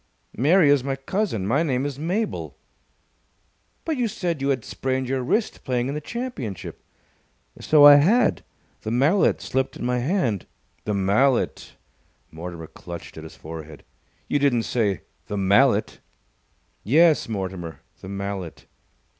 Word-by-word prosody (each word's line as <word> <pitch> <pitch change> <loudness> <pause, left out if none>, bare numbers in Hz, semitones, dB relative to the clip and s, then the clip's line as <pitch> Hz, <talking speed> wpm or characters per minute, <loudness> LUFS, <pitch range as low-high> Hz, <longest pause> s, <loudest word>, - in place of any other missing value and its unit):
"Mary 150 - +4
is 140 -3 +3
my 135 0 -2
cousin. 135 - -2
My 135 +9 +2
name 135 -5 0
is 140 -1 -4
Mabel." 190 +8 -3 1.3
"But 320 -3 -1
you 245 -2 +1
said 175 -7 -3
you 135 - 0
had 130 -4 -1
sprained 130 -1 -2
your 130 0 -1
wrist 210 - -1
playing 125 0 -1
in - - -2
the 150 - -4
championship." 235 - -6 0.8
"So 150 -2 +6
I 145 0 +10
had. 215 +12 +3 0.4
The - - -4
mallet 140 - +2
slipped 130 0 -2
in - - -5
my 125 0 0
hand." 125 - -1 0.4
"The 105 - -1
mallet!" 105 +7 +1 0.6
Mortimer 85 0 -7
clutched 85 +2 -10
at 80 - -9
his 80 - -11
forehead. 80 -1 -9 0.4
"You 145 - +1
didn't 130 -5 +2
say 105 -7 0 0.3
'the 105 - -3
mallet'?" 100 +4 +3 0.8
"Yes, 155 +3 +4
Mortimer! 95 -5 -5 0.2
The 95 - -10
mallet!" 100 -3 -5
130 Hz, 140 wpm, -23 LUFS, 100-150 Hz, 1.3 s, I